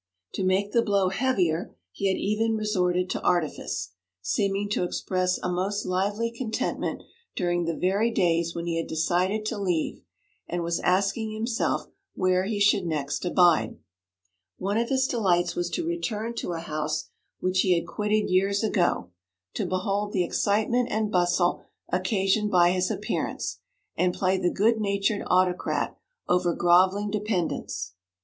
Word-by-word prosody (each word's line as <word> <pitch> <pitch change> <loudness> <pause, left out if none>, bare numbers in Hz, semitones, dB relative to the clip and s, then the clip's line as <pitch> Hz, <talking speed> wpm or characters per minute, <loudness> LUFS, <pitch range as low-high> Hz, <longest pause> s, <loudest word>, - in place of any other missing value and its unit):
To 195 - -2
make 190 +2 +1
the 235 - +4
blow 200 -4 +2
heavier 185 -7 0 0.2
he 195 - -2
had 190 - +1
even 220 +2 0
resorted 180 -4 +1
to - - -2
artifice, 160 - -1 0.3
seeming 195 - 0
to 205 - 0
express 185 +1 0
a - - -4
most 190 +3 -1
lively 205 +5 0
contentment 230 -1 -3 0.3
during 175 -1 0
the 165 -1 -2
very 200 +5 +2
days 170 -5 +1
when 170 0 -3
he 170 -1 -1
had 165 - -2
decided 180 +6 0
to 215 - -2
leave 180 -5 -1 0.5
and 175 0 -2
was 170 0 -1
asking 200 +4 +1
himself 225 +2 -1 0.3
where 185 0 +2
he 205 0 -2
should 205 -3 +3
next 145 0 -2
abide. 175 -10 +3 0.8
One 200 +3 0
of 235 - -1
his 265 -1 +2
delights 180 -8 +1
was 175 0 -1
to 340 - -2
return 235 -10 -2
to 175 - -3
a 165 - -4
house 155 -1 -3 0.3
which 185 0 0
he 185 -2 +4
had 170 - -2
quitted 210 0 0
years 195 +3 +2
ago, 175 - +1 0.4
to - - -2
behold 200 +2 -1
the 185 - +2
excitement 220 +7 +1
and 215 -1 -1
bustle 175 0 +2 0.3
occasioned 195 +3 +1
by 175 -2 +5
his 185 0 0
appearance, - - -3 0.4
and 180 0 +1
play 190 0 +1
the 180 -1 +2
good 220 +4 +2
natured 200 0 0
autocrat 180 0 +1 0.3
over 180 -1 +2
grovelling 185 +4 +3
dependents. 195 - -2
185 Hz, 155 wpm, -26 LUFS, 175-210 Hz, 0.8 s, by